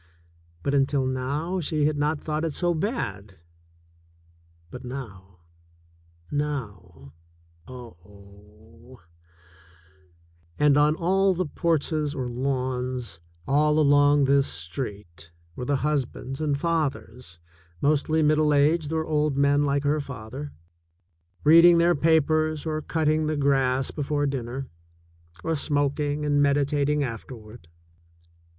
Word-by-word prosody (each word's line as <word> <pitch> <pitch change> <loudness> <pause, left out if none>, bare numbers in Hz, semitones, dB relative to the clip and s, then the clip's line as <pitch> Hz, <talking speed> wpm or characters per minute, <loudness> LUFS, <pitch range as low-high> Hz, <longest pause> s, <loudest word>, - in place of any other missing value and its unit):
But, 140 - -1
until 135 -1 +1
now, 140 +8 -2
she 155 -2 -1
had 155 0 +1
not 150 +1 0
thought 155 +1 -3
it 160 -3 -2
so 175 +2 0
bad. 115 - -4 1.4
But 125 - -9
now 95 -9 -9 0.4
— 85 0 -32
now 100 - -5 0.3
— 85 0 -32
oh! 105 +1 -15 1.6
And 150 -1 +4
on 150 +1 +3
all 190 +3 +2
the 185 +1 -1
porches 155 -2 -1
or 130 -2 -3
lawns 125 -4 -3 0.3
all 150 +2 +2
along 145 -1 +4
this 140 0 +3
street 85 - -7 0.3
were 125 - -5
the 145 - +1
husbands 135 -1 -3
and 145 -2 0
fathers, 140 - -3 0.4
mostly 155 +2 +1
middle 150 0 +3
aged 150 +2 +2
or 160 0 -1
old 150 -2 0
men 140 +1 +3
like 140 0 0
her 145 +2 +1
father, 135 +2 -8 0.9
read 165 +3 +7
ing 175 -1 +7
their 170 +1 +4
papers 155 -1 +1
or 155 -1 -2
cutting 155 0 0
the 155 -1 -1
grass 135 -2 +1
before 145 0 -2
dinner, 135 -1 -4 0.8
or 165 0 -1
smoking 145 0 -1
and 145 -1 +2
meditating 145 +1 +1
afterward. 115 -4 -8
140 Hz, 120 wpm, -25 LUFS, 125-155 Hz, 1.6 s, read